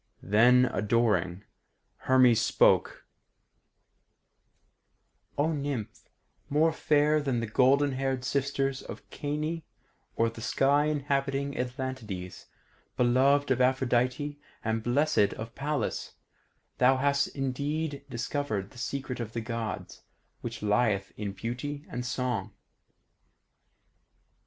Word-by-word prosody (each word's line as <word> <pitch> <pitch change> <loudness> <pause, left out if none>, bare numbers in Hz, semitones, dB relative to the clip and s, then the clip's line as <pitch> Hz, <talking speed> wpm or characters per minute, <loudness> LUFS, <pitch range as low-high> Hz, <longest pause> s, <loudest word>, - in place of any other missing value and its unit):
Then, 120 +6 +5
adoring, 105 -6 +1 0.5
Hermes 125 -3 +4
spoke: - - +3 2.3
"O 150 +3 +2
Nymph 140 -7 -4 0.4
more 155 +3 +3
fair 150 0 +2
than 135 -4 0
the 115 - -2
golden 135 +5 +3
haired 130 -1 -2
sisters 135 0 -1
of - - -9
Cyane 150 +3 -3 0.5
or 115 - +2
the 115 0 -7
sky 140 +5 +2
inhabiting 140 -1 -1
Atlantides, 125 -8 -5 0.5
beloved 135 +3 +3
of 130 0 +2
Aphrodite 130 +3 +1 0.3
and 110 0 0
blessed 120 -2 +2
of 115 +1 -7
Pallas, 145 +1 -3 0.6
thou 130 +1 +5
hast 140 +1 +2
indeed 140 +2 -2
discovered 115 -5 -3
the 125 - -12
secret 130 0 -4
of 110 -2 -5
the 115 - -2
Gods, 115 -1 -5 0.4
which - - -6
lieth 105 -2 +1
in 105 -2 -4
beauty 125 +8 -5
and 125 - -3
song. 125 -5 -2
130 Hz, 105 wpm, -29 LUFS, 115-140 Hz, 2.3 s, Then